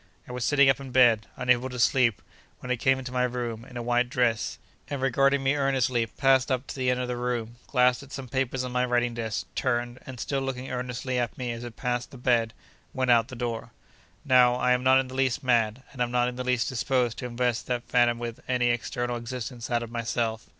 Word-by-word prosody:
I - - -9
was 125 -1 -3
sitting 140 0 +4
up 135 0 +4
in 135 -1 -8
bed, 120 -4 +4
unable 125 0 +1
to 125 - -7
sleep, 120 -2 +2 0.3
when 125 - -6
it 125 - +1
came 135 +2 +3
into 130 -1 -6
my 125 0 0
room, 120 -2 -2
in 125 0 -10
a 120 - -4
white 120 +1 +1
dress, 120 -3 0 0.3
and 140 - -4
regarding 135 +1 +2
me 135 +1 +3
earnestly, 130 -4 +1
passed 135 +2 +2
up 130 +1 0
to - - -7
the 130 -2 0
end 125 0 +1
of 125 - -2
the 125 - -2
room, 120 -1 -3
glanced 125 -2 +3
at 140 -1 -14
some 135 -2 -6
papers 130 0 -1
on 125 - -4
my 125 0 +1
writing 120 -1 +1
desk, 110 -2 -3
turned, 120 0 -1
and, 130 -2 -8
still 135 +3 -2
looking 135 -1 -4
earnestly 125 0 -3
at 120 -2 -2
me 125 -2 -3
as 115 0 -6
it 120 -2 -8
passed 125 -1 -2
the 135 - -12
bed, 120 -2 +1 0.4
went 130 -1 +2
out 115 -2 +5
at - - -26
the 130 - -9
door. 115 -1 -4 0.5
Now, 125 -3 +5
I 125 0 +1
am 125 0 +3
not 130 +1 +6
in 135 - -1
the 130 - -10
least 130 +1 0
mad, 120 -1 +1
and 130 - -7
am 120 - +1
not 125 0 +2
in 125 - -4
the 125 - -4
least 125 -2 +1
disposed 125 -2 0
to 125 - -4
invest 120 0 -1
that 125 -1 -2
phantom 120 -1 +3
with 115 -1 -5
any 125 -1 +2
external 120 0 -2
existence 120 0 -6
out 120 -1 0
of 115 - -8
myself. 115 -1 -2
125 Hz, 240 wpm, -27 LUFS, 120-130 Hz, 0.5 s, not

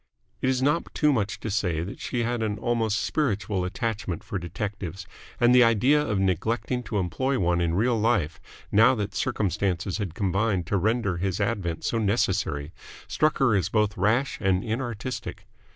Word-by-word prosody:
It 130 - +1
is 130 0 +1
not 150 +4 +1
too 150 -1 +3
much 110 -4 -1
to 110 - -3
say 90 -6 0
that 95 - -7
she 120 -1 -2
had 120 0 -1
an 105 -1 -1
almost 115 -2 0
spiritual 105 -9 -1
attachment 105 -4 -3
for 95 - -4
detectives, 95 +1 -5 0.3
and 120 0 +5
the 125 0 +7
idea 120 +6 +4
of 105 -9 -1
neglecting 110 +7 0
to 105 0 -2
employ 130 +9 0
one 85 -3 +1
in 85 -1 0
real 115 +3 +2
life, 105 -9 +1 0.3
now 115 +5 +6
that 105 -3 -3
circumstances 100 -6 -1
had 95 -6 -4
combined 100 -1 0
to 100 - 0
render 100 -2 0
his 95 +2 -2
advent 100 -6 -2
so 115 - 0
necessary, 95 -8 0 0.4
struck 155 0 +1
her 130 -5 +3
as 90 -3 +1
both 105 -1 +1
rash 110 +8 +1
and 95 -2 +2
inartistic. 120 +1 -4
105 Hz, 170 wpm, -26 LUFS, 95-120 Hz, 0.4 s, the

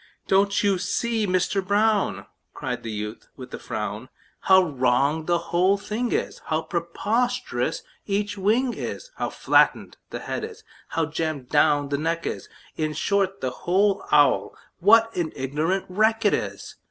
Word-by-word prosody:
"Don't 200 +1 +3
you 200 -2 +2
see, 225 +2 -1
Mister 185 +2 +1
Brown," 205 +2 +1 0.3
Cried - - -4
the 115 - -6
youth, 105 +1 -6
with 130 - -10
a - - -5
frown, 110 +1 -5 0.3
"How 190 -1 +5
wrong 140 +1 +1
the 175 -1 +3 0.2
whole 185 +3 +4
thing 220 +4 -3
is, - - -2
How 160 0 -1
preposterous 200 - -1 0.2
each 205 +1 -1
wing 225 +6 +1
is, - - -6
How - - -2
flattened - - +2
the - - -6
head - - -4
is, 445 0 -8 0.2
how 165 - -1
jammed 155 -4 -4
down 145 -1 +3
the 140 0 -1
neck 165 +2 -2
is - - -5 0.3
In 155 -1 -2
short, 195 +2 0
the 130 - -1
whole 195 +7 +1
owl, 145 -1 +4 0.2
what 225 +4 +5
an 170 -3 -2
ignorant 155 +8 -1
wreck 220 +4 +2
't - - +3
is! - - -6
180 Hz, 155 wpm, -24 LUFS, 150-205 Hz, 0.3 s, How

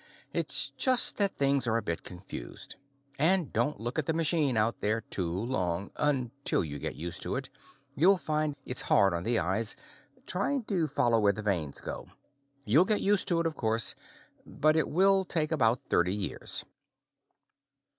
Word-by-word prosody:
It's - - +2
just 255 -3 +7
that 200 -2 +1
things 140 -2 +1
are 115 0 +1
a - - -2
bit 85 - -3
confused. 90 -9 -7 0.4
And 170 +1 +2
don't 120 +6 -1
look 120 +6 -4
at 150 - -4
the 160 - 0
machine 155 -6 +1
out 110 +2 -1
there 110 +2 -1
too 90 -6 -4
long 95 -3 -3
until 140 -4 -1
you 75 -2 -7
get - - -5
used 85 +1 -6
to - - -3
it, - - -5 0.5
you'll 185 +7 +4
find 155 -3 -2
it's 125 - +5
hard 100 -2 +3
on 85 - -3
the 115 +5 +1
eyes, 95 +5 +1 0.5
trying 240 +8 0
to 185 -7 -1
follow 120 -5 +1
where 100 -1 +2
the 110 - -7
vanes 85 -9 0
go. - - -8 0.6
You'll 135 +11 +4
get 210 +1 +1
used 205 -1 +1
to 170 -2 +1
it, - - -4
of 160 -1 -2
course, 115 0 +2 0.5
but 155 -9 0
it 160 - 0
will 195 +3 +3
take 160 -3 0
about 125 -6 +1
thirty 90 +2 +1
years. 100 -2 -4
125 Hz, 175 wpm, -28 LUFS, 105-160 Hz, 0.6 s, just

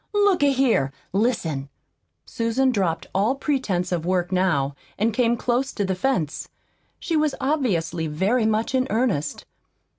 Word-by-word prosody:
Look 405 -4 +3
a 285 -1 +5
here, 250 - +2 0.2
listen!" 170 - 0 0.6
Susan 235 +3 +1
dropped 185 -8 -1
all 210 +7 +2
pretense 255 - -1
of 170 -3 -1
work 180 0 0
now, 170 -7 +1 0.2
and 220 +2 +1
came 235 0 +2
close 250 +3 0
to 205 - -1
the 190 - 0
fence. 185 - -1 0.5
She 330 - -2
was 305 -2 +1
obviously 210 - 0
very 200 +10 +1
much 220 +3 0
in 260 0 +2
earnest. 215 - -1
220 Hz, 145 wpm, -23 LUFS, 175-260 Hz, 0.6 s, a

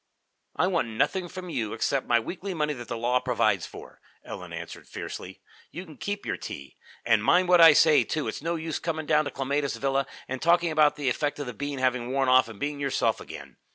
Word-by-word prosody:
"I - - +2
want 170 -9 0
nothing 175 - -1
from 180 0 -8
you 110 -7 -2
except 135 -2 -1
my 120 -1 +4
weekly 185 - -5
money 150 -1 0
that 120 -3 -9
the 120 - -4
law 120 +2 +1
provides - - +1
for," - - -13 0.2
Ellen - - -8
answered - - -8
fiercely. - - -8 0.3
"You 180 +3 -8
can 155 -4 -14
keep 205 0 -4
your - - -2
tea. 70 - -8 0.3
And 110 -2 +3
mind 180 +7 +3
what 180 -1 +6
I 165 -2 +10
say, 155 0 +5
too. 155 -2 -3
It's - - -4
no 165 +2 -1
use 160 -2 -3
coming 160 -2 -3
down 155 0 +3
to - - -2
Clematis 140 +2 -2
Villa 135 0 0 0.2
and 130 0 -5
talking 170 0 +3
about 155 -2 +4
the 145 -2 -4
effect 145 +4 0
of 145 - -4
the 125 - -6
bean 145 +4 -4
having 125 -2 0
worn 135 -1 +1
off 130 -1 +5
and 110 -3 -11
being 145 0 -3
yourself 140 -1 0
again. - - -10
145 Hz, 225 wpm, -27 LUFS, 130-165 Hz, 0.3 s, I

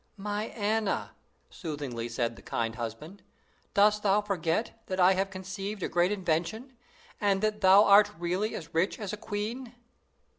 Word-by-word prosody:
"My 205 +1 -3
Anna," 215 -2 -1 0.4
soothingly 140 -8 -5
said 115 0 -2
the - - -14
kind 115 -1 -2
husband, 120 - -7 0.5
"dost 210 +1 +4
thou 205 0 +3
forget 200 +3 -2
that 185 0 -3
I 185 +1 +6
have 195 +1 0
conceived 190 +1 -6
a - - 0
great 175 +3 +2
invention, 190 - -2 0.5
and 200 -2 +2
that 215 0 0
thou 190 +1 +7
art 205 +1 +7
really 180 +6 -1
as 165 -2 -8
rich 165 +4 +1
as 210 -2 -5
a - - -1
queen?" 230 +5 -5
195 Hz, 155 wpm, -29 LUFS, 165-210 Hz, 0.5 s, thou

